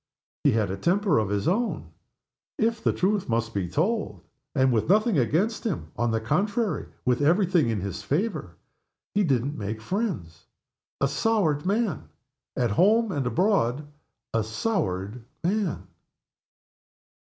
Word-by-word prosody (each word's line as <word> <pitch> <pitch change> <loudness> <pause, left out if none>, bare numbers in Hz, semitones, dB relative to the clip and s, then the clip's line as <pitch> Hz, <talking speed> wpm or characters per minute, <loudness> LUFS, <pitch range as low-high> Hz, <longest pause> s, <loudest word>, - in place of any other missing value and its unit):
He - - +4
had 110 -4 +1
a 95 - -3
temper 195 - +2
of 105 -3 -1
his 100 0 -1
own, 225 +6 -1 0.7
if 225 0 0
the - - +3
truth 195 -2 0
must 115 0 0
be 95 -4 -2
told; 215 - -1 0.3
and 130 -2 +3
with 110 +5 0
nothing 210 - +4
against 170 - +1
him 130 - -3
on 120 0 0
the 115 0 +1
contrary, 205 - 0 0.2
with 125 +1 +2
every 175 +7 +4
thing 170 -9 +2
in 110 -4 -1
his 100 +2 -4
favor 145 - -2 0.6
he 205 - +2
didn't 140 -2 0
make 105 +1 -4
friends. 135 - -3 0.6
A 140 - +4
soured 160 0 +1
man. 215 +1 0 0.5
At 120 -4 +1
home 215 - +4
and 140 -6 -1
abroad, 150 - +1 0.5
a 115 -1 +2
soured 110 - -2 0.2
man. 195 0 -1
150 Hz, 145 wpm, -26 LUFS, -, 0.7 s, He